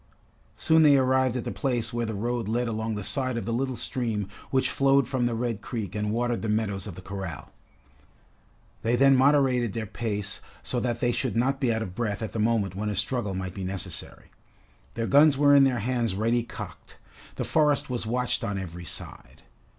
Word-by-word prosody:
Soon 160 0 +4
they 145 -3 +7
arrived 130 -1 +2
at 120 - -3
the - - -4
place 125 -4 -1
where 120 -1 -1
the 110 - -3
road 120 +1 -2
led 120 +2 0
along 110 0 -2
the 105 - -4
side 130 +1 0
of 115 - -3
the 115 - -2
little 130 +2 -1
stream 115 -6 -2 0.2
which 130 -1 +1
flowed 135 -1 +3
from 125 -3 0
the 120 - -1
Red 115 -3 -2
Creek 110 -7 -5
and 105 0 -2
watered 120 +2 0
the 110 - -2
meadows 105 -3 -1
of 95 - -7
the 90 - -10
corral. 95 -4 -6 1.3
They 115 +2 +1
then 135 +2 +5
moderated 130 -4 +3
their 115 -1 -3
pace 105 -1 -4 0.2
so 125 - -2
that 120 -1 -1
they 120 - +2
should 125 0 -2
not 135 +4 +1
be 125 -3 +2
out 110 0 0
of 90 - -7
breath 105 0 -2
at 110 - -4
the 115 - -4
moment 105 -4 +1
when 105 +2 -3
a 105 - -2
struggle 105 0 0
might 90 -1 -4
be 95 - -6
necessary. 95 -1 -5 0.6
Their 115 - -1
guns 145 +2 +5
were 145 0 +5
in 140 -1 +7
their 125 -4 +1
hands 120 -3 0
ready 115 +4 +1
cocked. 120 - -9 0.4
The - - -2
forest 150 -4 +2
was 120 -3 -2
watched 125 +2 0
on 100 -1 -2
every 90 -2 -6
side. - - -8
115 Hz, 205 wpm, -26 LUFS, 105-130 Hz, 1.3 s, they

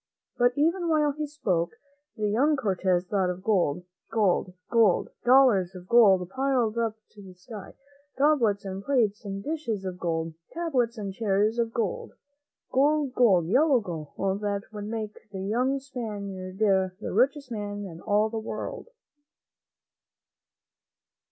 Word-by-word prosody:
But 245 0 +3
even 335 +4 +1
while 300 -2 +3
he 300 +1 -4
spoke, 185 - -1 0.4
the 210 -1 0
young 270 +9 +3
Cortez 185 -7 0
thought 190 -1 0
of 180 +1 -5
gold, 180 -6 +1 0.3
gold, 200 -4 +1 0.2
gold 225 -6 +3
— - - -48
dollars 240 -9 +5
of 180 0 -10
gold 195 -6 +5
piled 255 -1 0
up 225 -2 0 0.2
to 210 - -14
the 185 -2 -13
sky; 200 +2 -10 0.4
goblets 255 -9 +2
and 195 0 -5
plates 230 -6 +1
and 195 0 -5
dishes 255 -11 -3
of 180 -1 -5
gold; 165 -2 -2 0.2
tables 260 -9 0
and 200 -2 -5
chairs 210 +2 +1
of 230 -1 0
gold. 225 -5 -3 0.6
Gold, 285 0 +2
gold, 195 -10 +4
yellow 265 - +4
gold, 190 +2 -4
that 200 -1 -1
would 210 -1 -6
make 215 -1 -6
the 190 -2 -5
young 250 +7 +1
Spaniard 200 -8 -6
the 190 -3 +2 0.2
richest 275 -1 +1
man 205 -2 -4
in 170 -3 -9
all 210 +1 +2
the 225 0 -4
world. 220 - -6
215 Hz, 145 wpm, -27 LUFS, 190-255 Hz, 0.6 s, dollars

